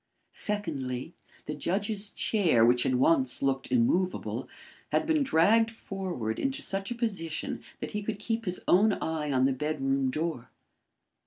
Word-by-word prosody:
Secondly, 155 Hz, -, 0 dB, 0.3 s
the 150 Hz, -, -4 dB
judge's 200 Hz, +6 st, 0 dB
chair, 170 Hz, -, +3 dB
which 120 Hz, +1 st, +4 dB
had 130 Hz, -, +1 dB
once 130 Hz, -1 st, +2 dB
looked 135 Hz, -1 st, 0 dB
immovable, 175 Hz, +10 st, 0 dB, 0.4 s
had -, -, +2 dB
been 315 Hz, -1 st, +2 dB
dragged 225 Hz, -, +4 dB
forward 185 Hz, -, -4 dB
into 270 Hz, 0 st, -1 dB
such 195 Hz, 0 st, -2 dB
a 240 Hz, -, -3 dB
position 195 Hz, -10 st, -3 dB, 0.2 s
that -, -, -5 dB
he 210 Hz, -, -3 dB
could 210 Hz, 0 st, -3 dB
keep 225 Hz, +2 st, -3 dB
his 180 Hz, -1 st, -3 dB
own 205 Hz, +4 st, +5 dB
eye 155 Hz, -4 st, -2 dB
on 130 Hz, -1 st, +3 dB
the 135 Hz, -, +2 dB
bedroom 135 Hz, -1 st, 0 dB
door. 155 Hz, -2 st, -3 dB
170 Hz, 150 wpm, -29 LUFS, 135-210 Hz, 0.4 s, own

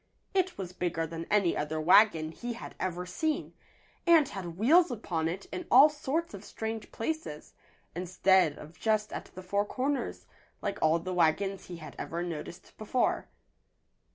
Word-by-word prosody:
It 375 Hz, -1 st, +1 dB
was 185 Hz, -2 st, -6 dB
bigger 175 Hz, -2 st, -1 dB
than 165 Hz, +1 st, -6 dB
any 200 Hz, -5 st, +3 dB
other 150 Hz, +1 st, -2 dB
wagon 165 Hz, -1 st, +5 dB
he 240 Hz, +8 st, -5 dB
had 235 Hz, -, -9 dB
ever 180 Hz, -1 st, -2 dB
seen, 315 Hz, -, -2 dB, 0.5 s
and 325 Hz, -4 st, +6 dB
had 175 Hz, -4 st, -6 dB
wheels 320 Hz, -, +5 dB
upon 180 Hz, -9 st, -2 dB
it 185 Hz, +4 st, -4 dB
in 360 Hz, -, -5 dB
all 275 Hz, +5 st, +8 dB
sorts 300 Hz, +1 st, -2 dB
of 200 Hz, 0 st, -8 dB
strange 220 Hz, +1 st, -5 dB
places, 305 Hz, -, -4 dB, 0.4 s
instead 185 Hz, -2 st, +3 dB
of 155 Hz, +3 st, -12 dB
just 215 Hz, -1 st, +1 dB
at -, -, -5 dB
the 185 Hz, -, -8 dB
four 200 Hz, +2 st, +1 dB
corners, 270 Hz, +6 st, -2 dB, 0.3 s
like 205 Hz, -, -3 dB
all 160 Hz, +1 st, +4 dB
the 185 Hz, +2 st, -4 dB
wagons 185 Hz, +3 st, +1 dB
he 175 Hz, -, -7 dB
had 155 Hz, -1 st, -10 dB
ever 170 Hz, +1 st, -3 dB
noticed 170 Hz, +1 st, -7 dB
before. 220 Hz, +4 st, 0 dB
190 Hz, 160 wpm, -30 LUFS, 170-240 Hz, 0.5 s, all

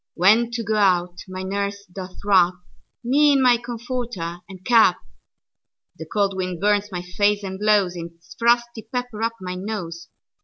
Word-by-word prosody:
When 220 Hz, +6 st, +4 dB
to 235 Hz, -1 st, -2 dB
go 215 Hz, 0 st, -1 dB
out, 180 Hz, -3 st, +2 dB
my 185 Hz, 0 st, -6 dB
nurse 200 Hz, +1 st, -3 dB
doth 185 Hz, +1 st, -9 dB
wrapMe 185 Hz, -3 st, +4 dB, 0.8 s
in 275 Hz, -, +3 dB
my 250 Hz, -2 st, +5 dB
comforter 235 Hz, -7 st, -5 dB
and 185 Hz, -1 st, -12 dB
cap; 225 Hz, -7 st, +5 dB, 1.0 s
The 160 Hz, -, -7 dB
cold 200 Hz, +2 st, 0 dB
wind 185 Hz, -2 st, -3 dB
burns 205 Hz, 0 st, +1 dB
my 180 Hz, -1 st, -4 dB
face, 205 Hz, +3 st, +1 dB
and 190 Hz, 0 st, -5 dB
blowsIts 180 Hz, -5 st, 0 dB
frosty 235 Hz, -1 st, +1 dB
pepper 245 Hz, -3 st, -4 dB
up 230 Hz, +1 st, 0 dB
my 180 Hz, -1 st, -5 dB
nose. 180 Hz, -3 st, -6 dB
200 Hz, 150 wpm, -22 LUFS, 180-225 Hz, 1.0 s, my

